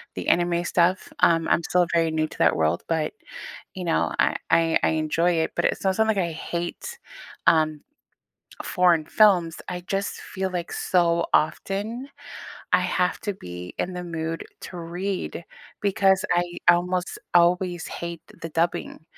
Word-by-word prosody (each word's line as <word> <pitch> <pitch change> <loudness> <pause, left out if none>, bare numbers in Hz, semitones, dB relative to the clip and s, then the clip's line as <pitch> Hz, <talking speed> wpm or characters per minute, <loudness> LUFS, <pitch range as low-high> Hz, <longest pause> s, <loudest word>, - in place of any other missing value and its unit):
the - - -5
anime 175 0 +2
stuff. 180 +2 +1
Um, 165 -1 +4
I'm 170 - +2
still 180 +1 +2
very 165 -1 +2
new 155 0 0
to - - -13
that 80 - +4
world, 80 +1 +1
but, 160 -2 0 0.6
you 185 -2 -5
know, 165 - +1
I - - +3
I 165 0 +3
I - - +4
enjoy 165 +3 +1
it, - - -3
but - - 0
it's - - 0
not 190 -1 +1
like 220 -1 +3
I 175 -3 0
hate, 170 - -5 0.5
um, 155 -2 +3 0.8
foreign 175 -3 +3
films. 180 -7 +4
I 180 0 -4
just 195 0 -2
feel 190 0 -4
like 175 -2 -4
so 170 -2 +2
often, 210 - 0 0.6
I - - +5
have 180 0 0
to 205 - -3
be 90 - -9
in 185 - -2
the 180 0 -5
mood 165 -1 -4 0.2
to 180 - -8
read 175 +1 -4 0.4
because 195 -1 +3
I 175 0 +2 0.3
almost 180 +1 -2 0.2
always 175 0 +3
hate 170 -1 -6 0.2
the 165 - -5
dubbing. 165 0 -2
175 Hz, 155 wpm, -24 LUFS, 165-185 Hz, 0.8 s, I